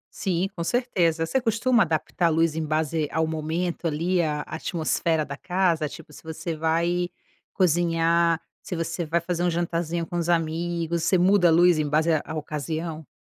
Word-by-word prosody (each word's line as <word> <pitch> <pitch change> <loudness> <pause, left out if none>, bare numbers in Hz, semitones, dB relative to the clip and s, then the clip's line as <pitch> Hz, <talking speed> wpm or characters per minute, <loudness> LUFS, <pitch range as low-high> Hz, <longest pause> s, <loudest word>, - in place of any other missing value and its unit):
Sim, 185 -1 -1
com 170 - -3
certeza. 170 -8 +1
Você 265 +11 0
costuma 230 0 +2
adaptar 165 +1 -1
a - - +5
luz 165 -1 +1
em 160 - -1
base 155 0 0
ao 160 0 +1
momento, 160 +3 -2
ali, 170 +4 0
a 150 -3 0
atmosfera 160 -1 -1
da 140 -1 -7
casa? 175 -3 0
Tipo, 150 - -12
se - - -13
você 160 +1 -5
vai 170 +3 0 0.5
cozinhar, 170 -1 +2 0.2
se - - -6
você 165 0 -3
vai 170 +2 +1
fazer 175 +1 -2
um 175 - +2
jantarzinho 170 0 -1
com 175 - -6
os 170 -1 -1
amigos, 170 0 0
você 185 - +3
muda 185 +1 +4
a - - +5
luz 175 0 +5
em 150 -1 0
base 155 +3 +2
à 155 - +1
à - - -5
ocasião? 155 +1 -4
165 Hz, 180 wpm, -25 LUFS, 160-175 Hz, 0.5 s, a